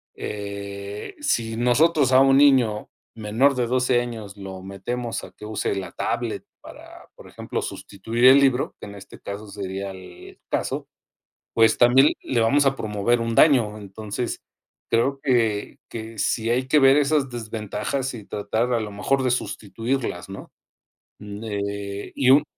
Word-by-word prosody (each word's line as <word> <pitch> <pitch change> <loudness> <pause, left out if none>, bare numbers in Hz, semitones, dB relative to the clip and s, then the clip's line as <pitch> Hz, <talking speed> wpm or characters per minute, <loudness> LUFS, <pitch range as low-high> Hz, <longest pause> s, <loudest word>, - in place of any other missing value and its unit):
eh, 100 0 -6
si 115 - -1
nosotros 135 +3 +3
a 130 - +8
un 135 0 +5
niño 130 -7 +4 0.3
menor 115 +6 +2
de 125 - 0
12 125 0 +2
años 110 -4 -7
lo 95 -1 -8
metemos 115 +5 -4
a - - -10
que 105 - -12
use 105 -1 -2
la 95 -3 -5
tablet - - -3 0.2
para, - - -13
por - - -14
ejemplo, - - -4
sustituir 115 +5 -2
el 130 +2 +9
libro 135 -1 +1
que - - -8
en 100 - -10
este 100 0 -12
caso 100 +1 -7
sería 95 0 -5
el 90 -2 -13
caso, - - -2 0.6
pues 115 -1 +4
también 130 +4 +6
le 120 - -1
vamos 140 +6 +3
a 135 0 +3
promover 110 +1 0
un 115 0 -2
daño. 120 -9 +4
Entonces, 105 +3 -5 0.5
creo 135 +4 +1
que 115 -7 0
que 110 -1 -7
si 115 +2 0
hay 130 +2 +1
que 150 +2 +4
ver 135 0 +6
esas 145 -2 +2
desventajas 115 +3 -4
y 110 -4 -8
tratar 110 +5 -2
a 115 - +2
lo 105 -1 -5
mejor 130 +7 0
de 125 - +1
sustituirlas, 115 -3 -3
¿no? 95 - -9 0.7
Eh 100 -1 -5
y 130 -2 +3
un 145 +2 +6
115 Hz, 155 wpm, -23 LUFS, 100-130 Hz, 0.7 s, el